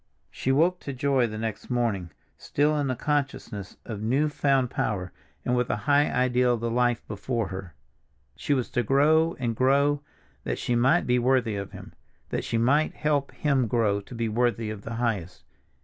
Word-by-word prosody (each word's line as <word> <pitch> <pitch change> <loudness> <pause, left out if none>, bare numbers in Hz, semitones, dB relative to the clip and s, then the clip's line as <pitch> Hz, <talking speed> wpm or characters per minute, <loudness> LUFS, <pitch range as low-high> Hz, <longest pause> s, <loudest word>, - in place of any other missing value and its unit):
She 130 - -1
woke 170 +6 +3
to 140 - -6
joy 130 -1 +2
the 110 -1 -6
next 110 -1 -4
morning, 115 -8 0 0.3
still 150 +2 +1
in 145 -2 0
this 130 -2 -1
consciousness 135 -9 -3
of 105 -3 -6
new 135 +8 +1
found 135 -4 +1
power, 90 -4 -2 0.3
and 125 - +1
with 125 0 0
a - - +1
high 145 0 +4
ideal 125 -1 +2
of - - -6
the 115 0 -2
life 120 -1 +1
before 115 0 -2
her. 95 -4 -7 0.6
She 145 - 0
was 125 -3 -2
to 120 - +1
grow 155 +7 +3
and 120 -3 -2
grow 140 +3 +3 0.4
that - - -2
she 120 - -1
might 130 +9 +3
be 125 0 +2
worthy 125 -3 +2
of 100 -1 -5
him—that - - -8
she 115 - -1
might 140 +7 +2
help 145 -2 0
him 135 -5 +1
grow 105 -3 +1
to 120 - -11
be 115 0 -1
worthy 115 0 0
of 105 -2 -7
the 115 +2 -6
highest. 110 -7 -2
125 Hz, 185 wpm, -26 LUFS, 115-140 Hz, 0.6 s, high